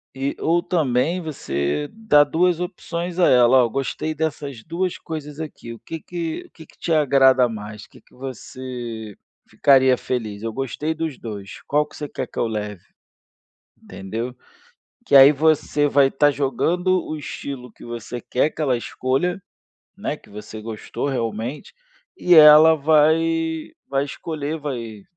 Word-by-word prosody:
E, 135 +1 -2
ou 170 +2 +1
também, 165 -1 0
você 100 - -2
dá 215 -9 +4
2 170 +4 +1
opções 175 -1 -5
a 180 - +5
ela. 125 +1 +6
"Oh, - - +3
eu - - -6
gostei 135 +4 -3
dessas 145 -5 -4
2 175 +5 -3
coisas 150 -2 -7
aqui". 145 -6 -7
"O 115 - -10
que 165 - -7
que 170 -2 -5
o - - -40
que 160 - -14
que - - -24
te 170 - -2
agrada 135 -4 +4
mais? 105 -1 -8
"O - - -20
que - - -18
que - - -29
você 125 -4 -7 0.3
ficaria 130 -2 +4
feliz?". 110 -5 -4
"Eu 115 0 -3
gostei 135 +5 -3
dos 160 -4 -4
2". 100 -4 -8
"Qual 150 +1 +2
você 150 - -6
quer - - -4
que - - -11
eu - - +1
leve?" 105 -4 -5 1.0
Entendeu? 115 +6 -6 0.7
Que - - +1
aí 135 0 +10
você 150 0 +2
vai 140 -1 +4
tá 145 +2 +3
jogando 175 +7 0
o 155 - -4
estilo 135 -3 -7
que - - -15
você 120 +1 -6
quer 130 +6 0
que - - -11
ela 135 -5 +2
escolha, 135 +9 -2 0.6
né, - - -3
que - - -21
você 105 +1 -9
gostou 110 +5 -5
realmente, 120 +1 -4 0.4
e 180 - +4
ela 155 +1 +9
vai 160 +2 +2 0.2
vai 135 0 0
escolher, 150 +1 -5
vai 115 -8 -6
140 Hz, 160 wpm, -22 LUFS, 120-160 Hz, 1.0 s, aí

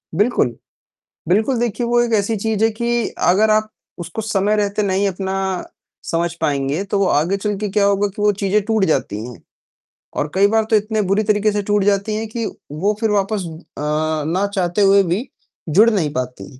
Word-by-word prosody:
बिल्कुल। 205 - +1 0.7
बिल्कुल, 220 - +2
देखिए 240 0 -1
वो 240 0 +2
एक 235 -1 0
ऐसी 215 +1 +1
चीज़ 220 +1 -1
है 225 - +5
कि 235 +1 -1 0.2
अगर 215 +4 +4
आप 215 0 +2 0.3
उसको 175 +6 -5
समय 210 -1 +1
रहते 210 0 0
नहीं 195 0 +1
अपना 190 0 -3 0.8
समझ 170 0 0
पाएँगे, 140 +4 0
तो 200 0 -1
वो 195 - +3
आगे 170 +7 +1
चलके 210 0 -2
क्या 200 +1 +2
होगा 200 0 +2
कि 200 +1 -8
वो 210 0 +4
चीज़ें 200 +2 +2
टूट 220 -3 +2
जाती 105 -9 0
हैं 125 - -11 0.8
और 150 - -1
कई 200 +1 +5
बार 220 +1 +2
तो 220 - +4
इतने 215 +1 +1
बुरी 210 +2 +2
तरीके 210 +1 +2
से 205 - -1
टूट 205 -1 +3
जाती 200 +1 +1
हैं 225 +1 -3
कि 225 +1 -4 0.3
वो 195 +8 0
फिर 225 -2 +1
वापस 200 -1 0
अ, 160 -2 -11 0.4
ना 185 +6 0
चाहते 180 +1 0
हुए 195 0 +5
भी 190 +9 -2 0.4
जुड़ 205 +9 +6
नहीं 185 -9 0
पाती 125 +1 -5
205 Hz, 190 wpm, -19 LUFS, 185-215 Hz, 0.8 s, जुड़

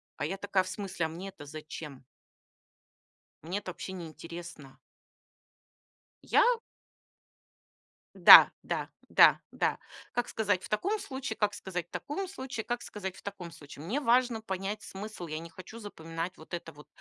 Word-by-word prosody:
А 145 - -2
я 195 +6 -3
такая: 200 -1 +1
"В 185 - -7
смысле, 185 -4 -2
а - - -9
мне 180 +4 -7
это 185 - -10
зачем?" 150 -3 -8 1.4
Мне 180 +6 -3
это 185 -2 -6
вообще 190 +2 -7
не 175 -3 -6
интересно. 165 -3 -10 1.5
Я? - - +5 1.7
Да - - +11
да - - -2 0.2
да - - +7
да. - - 0 0.3
Как 245 -1 -1
сказать 205 -4 0
в - - -8
таком 395 - 0
случае, 265 - -4
как 210 -1 +1
сказать 180 -2 -4
в - - -61
таком 380 +6 -4
случае, 260 - -5
как 240 0 -2
сказать 190 -3 -6
в - - -13
таком 190 -4 -7
случае. 145 0 -11
Мне 250 +11 0
важно 245 -3 +3
понять 195 +1 -4
смысл. 200 -2 -7
Я 155 +1 -4
не 165 0 -9
хочу 185 +7 -11
запоминать 165 -4 -6
вот 160 - -15
это 170 -1 -4
вот 150 +1 -15
190 Hz, 160 wpm, -30 LUFS, 165-220 Hz, 1.7 s, Да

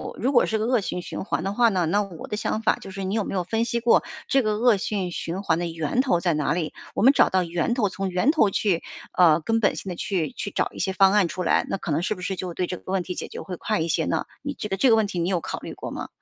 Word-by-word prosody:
如 260 +4 0
果 240 - +5
是 220 - 0
个 215 - -1
恶 245 0 +3
性 180 - -3
循 - - -6
环 175 - -1
的 195 - -2
话 235 +2 +4
呢， 185 -5 +1
那 200 +6 +2
我 190 -6 -7
的 210 - -3
想 220 +1 -1
法 225 - +3
就 - - -10
是 195 0 -5
你 190 +1 -2
有 220 - +1
没 - - -5
有 185 -2 0
分 225 +5 0
析 235 0 -1
过 235 - +5 0.3
这 270 - +4
个 215 -3 0
恶 235 -1 +4
性 190 -2 -2
循 170 +3 -4
环 165 -5 +1
的 175 - -1
源 165 - -2
头 250 -11 +2
在 175 -2 +2
哪 150 -1 0
里？ 165 -3 -2 0.2
我 - - 0
们 265 - +8
找 - - +5
到 185 -1 +2
源 170 +7 -1
头， 220 -5 +1
从 195 +1 -3
源 185 +11 +2
头 260 -11 +3
去， 190 -3 +1 0.3
呃， 170 -3 +5
根 225 +7 +1
本 205 - +2
性 195 - -6
地 180 - -4
去 180 -8 -1
去 200 - -5
找 - - 0
一 - - -11
些 190 +1 0
方 190 0 +5
案 205 -4 +4
出 180 +2 -4
来， - - +2
那 - - -1
可 175 - -5
能 150 - +1
是 - - -1
不 180 - -11
是 190 +2 -2
就 180 -1 -4
对 180 - -1
这 180 - -4
个 - - -18
问 190 -2 +1
题 180 - -5
解 - - -5
决 - - -8
会 185 - -6
快 - - -1
一 165 - -1
些 - - +1
呢？ - - 0 0.2
你 285 - -4
这 210 - -4
个 195 - -1
这 255 - +4
个 225 - +6
问 220 -1 +3
题 185 -3 -4
你 170 - 0
有 180 -3 0
考 - - -5
虑 - - -8
过 - - -7
吗？ - - -5
195 Hz, 345 characters per minute, -24 LUFS, 175-220 Hz, 0.3 s, 们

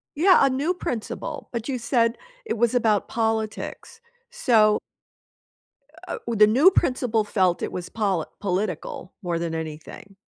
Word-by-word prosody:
Yeah, 360 +5 +5
a 275 - +3
new 280 +7 0
principal, 240 -10 -5
but 235 0 -4
you 265 - -1
said 235 -1 +1 0.3
it 415 - -2
was 235 +1 +2
about 220 -4 +2
politics, 220 - -3 0.3
so 225 - +3 1.3
Uh, - - -4
w 235 - -1
the 210 0 +7
new 265 - +6
principal 250 - +1
felt 185 -4 +1
it - - -2
was 180 0 -6
poli 195 -7 -1
political 185 -2 -3
more 175 -2 -1
than 165 -1 -3
anything. 160 +5 -8
220 Hz, 145 wpm, -24 LUFS, 190-250 Hz, 1.3 s, the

